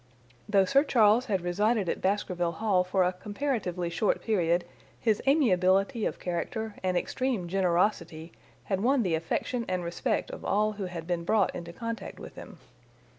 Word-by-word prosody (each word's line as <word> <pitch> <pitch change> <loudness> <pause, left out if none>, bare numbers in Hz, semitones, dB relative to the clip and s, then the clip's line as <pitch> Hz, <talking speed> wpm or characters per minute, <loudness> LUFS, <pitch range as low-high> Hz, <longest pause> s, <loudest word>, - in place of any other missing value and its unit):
Though 200 -2 +4
Sir 275 +8 +4
Charles 230 -3 +4
had 195 -5 0
resided 205 +4 +1
at - - -2
Baskerville 180 -3 0
Hall 190 0 +1
for 185 +1 +1
a 180 +1 +1
comparatively 195 -4 -3
short 200 +5 +1
period 175 -5 +1 0.3
his 220 -3 +1
amiability 200 - +3
of - - -5
character 215 +5 -3
and 185 -1 0
extreme 245 -2 -1
generosity 175 -3 0 0.3
had 195 -1 -2
won 255 +2 +3
the 180 -4 0
affection 165 +9 -1
and 180 -1 -1
respect 170 0 -2
of - - -8
all 210 +2 +1
who 205 -2 -5
had 175 -3 -6
been 175 -1 -2
brought 205 +2 +2
into 170 0 -7
contact 230 +5 -6
with - - -10
him. - - -11
195 Hz, 165 wpm, -28 LUFS, 175-220 Hz, 0.3 s, Though